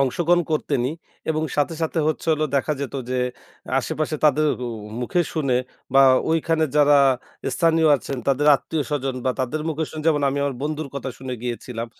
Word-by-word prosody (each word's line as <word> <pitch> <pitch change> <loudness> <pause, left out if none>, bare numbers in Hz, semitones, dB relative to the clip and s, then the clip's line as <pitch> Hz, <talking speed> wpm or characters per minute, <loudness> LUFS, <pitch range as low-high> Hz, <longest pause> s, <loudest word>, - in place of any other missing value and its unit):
অংশগ্রহণ 175 +6 +2
করতেনই, 140 -3 0 0.4
এবং 155 0 0
সাথে, 150 +3 +1
সাথে 160 +1 -1
হচ্ছে 155 - -3
হলো 155 0 +1
দেখা 140 +3 +1
যেত 140 -2 -4 0.2
যে 130 - 0 0.6
আশেপাশে 155 0 -2
তাদের 150 +1 +4 0.2
অ - - -3 0.3
মুখে 125 +8 0
শুনে 140 -6 +1 0.4
বা 135 - +6 0.3
ঐখানে 160 0 +2
যারা 145 0 +6 0.6
স্থানীয় 165 +1 +3
আছেন 135 0 -5
তাদের 140 +2 +2
আত্মীয়স্বজন 140 -3 -3
বা 130 - +2
তাদের 140 +5 -2
মুখে 160 0 -1
শুনে 155 - -6
যেমন 150 -3 +3
আমি 140 - -1
আমার 140 -1 -1
বন্ধুর 155 0 -3
কথা 140 -1 -4
শুনে 130 -1 -6
গিয়েছিলাম, 120 -1 -4
150 Hz, 165 wpm, -23 LUFS, 135-155 Hz, 0.6 s, বা